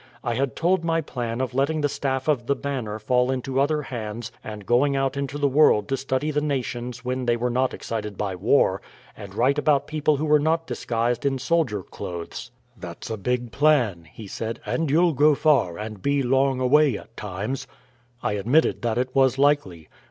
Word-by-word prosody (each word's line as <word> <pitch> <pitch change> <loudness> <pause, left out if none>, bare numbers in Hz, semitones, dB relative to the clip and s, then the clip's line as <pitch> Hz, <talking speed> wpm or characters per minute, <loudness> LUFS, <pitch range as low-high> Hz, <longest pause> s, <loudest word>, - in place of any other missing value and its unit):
I 120 - -1
had 130 0 -1
told 175 +1 +1
my 165 0 +1
plan 120 -5 -4
of 130 -1 -2
letting 140 +4 +1
the 145 - +2
staff 135 -1 -2
of 130 -6 +1
The 140 - +2
Banner 130 -6 -4
fall 125 +3 +1
into 130 0 -1
other 150 +1 +1
hands 115 -3 -6
and 105 -2 -8
going 140 +5 +3
out 135 0 0
into 140 0 -3
the 145 -1 +2
world 135 -7 +4
to 135 - +1
study 135 +3 -1
the 150 0 0
nations 125 -3 -3
when 125 0 -2
they 120 0 +3
were 125 +1 -1
not 130 +2 +1
excited 105 -3 -5
by 100 -2 -2
war, 95 0 +2 0.3
and 100 -2 -10
write 135 +6 +2
about 145 -2 +2
people 155 -1 +1
who 155 - -1
were 150 0 +4
not 160 +2 +1
disguised 120 -2 -1
in 140 -1 +1
soldier 130 - 0
clothes. 85 +9 -7 0.3
"That's 90 +1 -8
a - - -1
big 125 +3 -2
plan," 125 - +2
he 110 - -10
said, 110 +3 -5
"and 125 +8 -1
you'll 165 +3 +3
go 150 +2 +4
far, 140 - +2
and 105 -2 -7
be 140 +3 +1
long 135 +1 +2
away 135 -1 +4
at 115 - -14
times." 105 +6 -4 0.6
I - - 0
admitted 120 +11 +2
that 115 -1 -1
it 130 +1 -1
was 135 -1 +3
likely. 135 - +1
130 Hz, 195 wpm, -24 LUFS, 115-145 Hz, 0.6 s, world